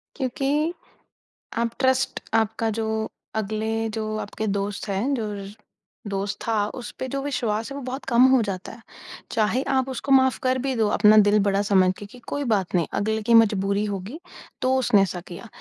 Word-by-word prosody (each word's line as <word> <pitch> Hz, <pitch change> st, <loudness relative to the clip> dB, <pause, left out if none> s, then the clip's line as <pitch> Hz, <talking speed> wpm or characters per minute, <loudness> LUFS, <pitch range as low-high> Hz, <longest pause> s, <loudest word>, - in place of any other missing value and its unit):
क्योंकि 280 Hz, +5 st, 0 dB, 0.8 s
आप 235 Hz, 0 st, +1 dB
ट्रस्ट 260 Hz, 0 st, +1 dB, 0.2 s
आपका 225 Hz, 0 st, +1 dB
जो 220 Hz, -, -1 dB, 0.5 s
अगले 220 Hz, +1 st, -1 dB
जो 220 Hz, 0 st, -3 dB
आपके 215 Hz, +1 st, -4 dB
दोस्त 200 Hz, +1 st, -2 dB
हैं 205 Hz, +9 st, 0 dB
जो 230 Hz, -4 st, -2 dB, 0.8 s
दोस्त 200 Hz, 0 st, -2 dB
था 225 Hz, -, +1 dB, 0.3 s
उस -, -, -7 dB
पे 260 Hz, -, -3 dB
जो 275 Hz, +2 st, -3 dB
विश्वास 230 Hz, -6 st, -2 dB
है -, -, -5 dB
वो -, -, -6 dB
बहुत 260 Hz, +2 st, -5 dB
कम 235 Hz, -1 st, +4 dB
हो 260 Hz, -2 st, +5 dB
जाता 195 Hz, -3 st, -5 dB
है। 225 Hz, -, -13 dB, 0.5 s
चाहे 220 Hz, +3 st, +1 dB
आप 260 Hz, 0 st, +1 dB
उसको 265 Hz, +2 st, -4 dB
माफ़ 260 Hz, -1 st, +5 dB
कर 255 Hz, 0 st, +2 dB
भी 265 Hz, 0 st, -1 dB
दो, 220 Hz, -2 st, +2 dB
अपना 210 Hz, +1 st, +5 dB
दिल 210 Hz, 0 st, +5 dB
बड़ा 200 Hz, 0 st, +2 dB
समझ 190 Hz, -2 st, +3 dB
के 205 Hz, -, -7 dB
कि 230 Hz, +5 st, -14 dB
कोई 285 Hz, -, -2 dB
बात 195 Hz, -4 st, -1 dB
नहीं 170 Hz, -2 st, +2 dB
अगले 220 Hz, +2 st, -1 dB
की 235 Hz, -, +2 dB
मजबूरी 205 Hz, -3 st, +4 dB
होगी, 205 Hz, -, -5 dB, 0.4 s
तो 260 Hz, +1 st, +2 dB
उसने 225 Hz, -6 st, +4 dB
ऐसा 180 Hz, -2 st, -1 dB
किया। 175 Hz, +6 st, -9 dB
220 Hz, 185 wpm, -24 LUFS, 205-260 Hz, 0.8 s, हो